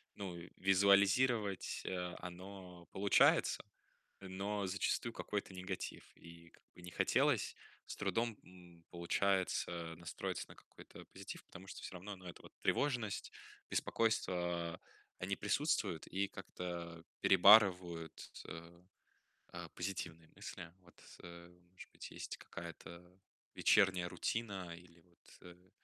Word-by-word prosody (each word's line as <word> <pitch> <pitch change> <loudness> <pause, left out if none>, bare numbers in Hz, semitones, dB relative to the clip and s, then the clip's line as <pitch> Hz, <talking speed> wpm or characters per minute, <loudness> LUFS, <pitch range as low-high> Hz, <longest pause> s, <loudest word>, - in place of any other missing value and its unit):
ну, 95 -3 -5 0.2
визуализировать, 100 +2 +4
э, 90 -1 -2
оно 90 -1 -9
получается, 100 +1 +4 0.6
но 100 +2 -2
зачастую 100 +5 0
какой-то 105 -4 -3
негатив 90 0 -4
и 85 0 -13
как - - -23
бы 90 - -13
не 90 0 -8
хотелось. - - +2 0.3
С - - -6
трудом, 110 +3 0
м, 90 -2 -16
получается 85 -1 0
настроиться 85 -1 -4
на - - -12
какой-то - - -14
позитив, - - -9
потому 95 - -12
что - - -8
всё - - -7
равно, 95 +3 -6
ну, 90 -1 -15
эта 85 - -8
вот - - -14
тревожность, 120 -8 0 0.4
беспокойство 90 -6 0 0.4
они 95 +2 -1
присутствуют 105 - 0
и 100 +1 0
как-то 85 -3 -6 0.2
перебарывают 90 -4 +6
т - - -10
т - - -10
э, 85 +1 -10 0.7
а, 85 -1 -6
позитивные 85 -3 -4
мысли. 85 -1 -7
Вот, 90 -1 -20 0.2
э, 85 0 -10 0.2
может 95 - -12
быть, - - -9
есть - - -5
какая-то 90 +2 -10 0.3
вечерняя 95 -4 +4
рутина 95 -5 -2
или 85 -1 -17
вот, 85 +1 -21
э, 90 +1 -14
90 Hz, 125 wpm, -37 LUFS, 85-100 Hz, 0.7 s, перебарывают